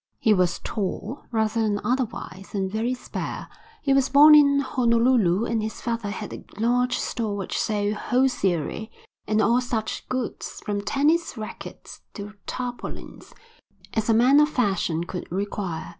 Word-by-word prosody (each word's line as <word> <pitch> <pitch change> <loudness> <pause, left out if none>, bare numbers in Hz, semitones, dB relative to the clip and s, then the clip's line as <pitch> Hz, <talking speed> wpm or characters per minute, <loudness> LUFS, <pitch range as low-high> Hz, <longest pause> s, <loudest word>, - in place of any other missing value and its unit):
He 220 - +3
was 180 -3 +2
tall 215 +4 -4
rather 220 0 +1
than 210 -2 +1
otherwise 230 -6 -3
and 190 -1 -1
very 230 +4 -1
spare. 250 - -6 0.4
He 275 - +3
was 270 -1 +3
born 295 +2 +8
in 280 -2 +6
Honolulu 235 -6 +2
and 230 -2 0
his 220 +1 -5
father 230 -3 -3
had 200 - -6
a - - -8 0.2
large 250 +2 +2
store 220 -4 -2
which 195 - -3
sold 205 -1 0
hosiery 220 - 0 0.4
and 215 +1 +2
all 240 +2 +3
such 225 -3 -3
goods, 255 -2 -4
from 205 -1 -1
tennis 295 +6 +1
racquets 215 -1 -9
to 205 -1 -7
tarpaulins, 245 -1 -6 0.6
as 220 0 -1
a 225 - +5
man 255 +5 +6
of 300 0 +4
fashion 190 - 0
could 175 0 -7
require. 190 -3 -3
225 Hz, 150 wpm, -24 LUFS, 205-250 Hz, 0.6 s, born